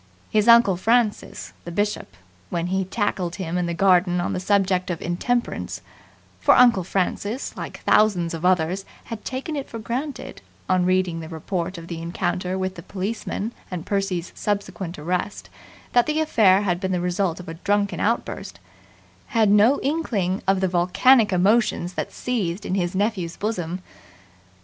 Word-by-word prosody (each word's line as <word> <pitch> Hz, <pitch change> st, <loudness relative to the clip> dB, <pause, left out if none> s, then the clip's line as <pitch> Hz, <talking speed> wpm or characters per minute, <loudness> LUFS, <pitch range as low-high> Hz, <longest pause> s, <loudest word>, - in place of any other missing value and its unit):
His 215 Hz, 0 st, +2 dB
uncle 235 Hz, -6 st, +6 dB
Francis, 210 Hz, -, 0 dB
the -, -, -7 dB
Bishop, 205 Hz, +4 st, -2 dB, 0.3 s
when 170 Hz, -1 st, -2 dB
he 190 Hz, 0 st, +1 dB
tackled 190 Hz, -4 st, -2 dB
him 180 Hz, -3 st, -4 dB
in 180 Hz, -1 st, 0 dB
the 170 Hz, -, -2 dB
garden 180 Hz, -1 st, +3 dB
on 175 Hz, -, -1 dB
the -, -, -2 dB
subject 190 Hz, -1 st, +1 dB
of 170 Hz, -2 st, -2 dB
Intemperance 240 Hz, +8 st, -2 dB, 0.6 s
for -, -, +5 dB
Uncle 240 Hz, -7 st, +5 dB
Francis, 200 Hz, +6 st, -2 dB
like -, -, -7 dB
thousands 185 Hz, -6 st, +3 dB
of 165 Hz, 0 st, -5 dB
others, 180 Hz, +1 st, +2 dB, 0.2 s
had 225 Hz, -2 st, -7 dB
taken 270 Hz, +4 st, -4 dB
it 280 Hz, -, -4 dB
for 230 Hz, -, -6 dB
granted, 255 Hz, +6 st, -5 dB, 0.3 s
on 185 Hz, -1 st, +2 dB
reading 185 Hz, -2 st, +1 dB
the 160 Hz, -1 st, -7 dB
report 175 Hz, +2 st, -3 dB
of 165 Hz, 0 st, -9 dB
the 170 Hz, -1 st, -5 dB
encounter 180 Hz, +2 st, -2 dB
with 190 Hz, 0 st, -2 dB
the 170 Hz, -, -9 dB
policeman 200 Hz, +3 st, -4 dB, 0.2 s
and 180 Hz, -2 st, -5 dB
Percy's 195 Hz, -4 st, -2 dB
subsequent 200 Hz, -3 st, -3 dB
arrest, 180 Hz, +6 st, -3 dB, 0.4 s
that 245 Hz, -1 st, +4 dB
the 305 Hz, 0 st, 0 dB
affair 210 Hz, -11 st, +4 dB
had 175 Hz, -3 st, 0 dB
been 190 Hz, 0 st, -2 dB
the 180 Hz, -, 0 dB
result 180 Hz, 0 st, -1 dB
of 180 Hz, -, -10 dB
a 165 Hz, -, -5 dB
drunken 200 Hz, +4 st, 0 dB
outburst 230 Hz, +3 st, -2 dB, 0.7 s
had 220 Hz, -4 st, +3 dB
no 215 Hz, +7 st, +5 dB
inkling 220 Hz, -, -1 dB
of 195 Hz, 0 st, +3 dB
the 190 Hz, -, +2 dB
volcanic 200 Hz, +7 st, +4 dB
emotions 185 Hz, -1 st, +2 dB
that -, -, -4 dB
seethed 205 Hz, -7 st, -2 dB
in -, -, -2 dB
his 180 Hz, -1 st, -1 dB
nephew's 190 Hz, -4 st, -1 dB
bosom. 185 Hz, -4 st, -3 dB
190 Hz, 165 wpm, -23 LUFS, 175-215 Hz, 0.7 s, uncle